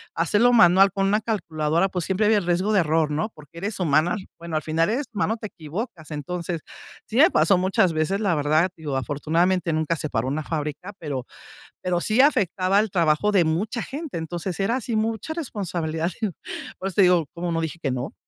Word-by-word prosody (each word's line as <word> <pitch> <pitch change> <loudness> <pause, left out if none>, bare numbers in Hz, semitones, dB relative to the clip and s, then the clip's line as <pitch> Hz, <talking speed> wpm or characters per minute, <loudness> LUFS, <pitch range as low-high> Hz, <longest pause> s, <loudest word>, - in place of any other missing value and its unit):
hacerlo 210 +9 +3
manual, 195 -3 +6
con 195 0 +1
una 210 +2 +3
calculadora, 170 -5 0
pues, 180 -3 -2
siempre 200 +2 +1
había 215 0 +4
el 190 - -6
riesgo 180 +4 +1
de 205 - +5
error, 155 -1 +1
¿no? 155 +7 -1
Porque 150 +2 -15
eres 200 +3 -3
humana, 155 +3 +2 0.2
bueno, 170 -1 -6
al 155 - +1
final, 160 +3 +1
eres 260 +6 -1
humano, 215 +1 0
te 215 - -6
equivocas. 165 - -7
Entonces, 170 +2 -4 0.4
sí 225 - -4
me 315 +6 +7
pasó 195 - +4
muchas 190 +1 +2
veces, 170 +6 0
la 195 -5 +2
verdad, 155 +4 +2
digo, 150 -4 -4
afortunadamente 165 +7 0
nunca 160 +1 0
se 155 - -4
paró 115 -2 -1
una 150 +3 -2
fábrica, 155 +5 -4
pero 140 -6 -4 0.6
pero 180 -1 0
sí 220 +7 +3
afectaba 195 - +2
al 215 +1 +1
trabajo 170 +3 +2
de 185 -4 +5
mucha 205 +9 -1
gente. 290 - -6
Entonces, 170 +2 -4
era 230 +6 +1
así 245 -2 -3
mucha 225 +7 -1
responsabilidad 175 - -3
y, 220 - +2 0.5
por 195 - -3
eso 185 - -10
te - - +5
digo, 180 -4 +4
¿cómo 170 0 -3
no 165 - 0
dije 160 0 -4
que 135 - -1
no? 125 +1 -4
175 Hz, 205 wpm, -24 LUFS, 155-205 Hz, 0.6 s, me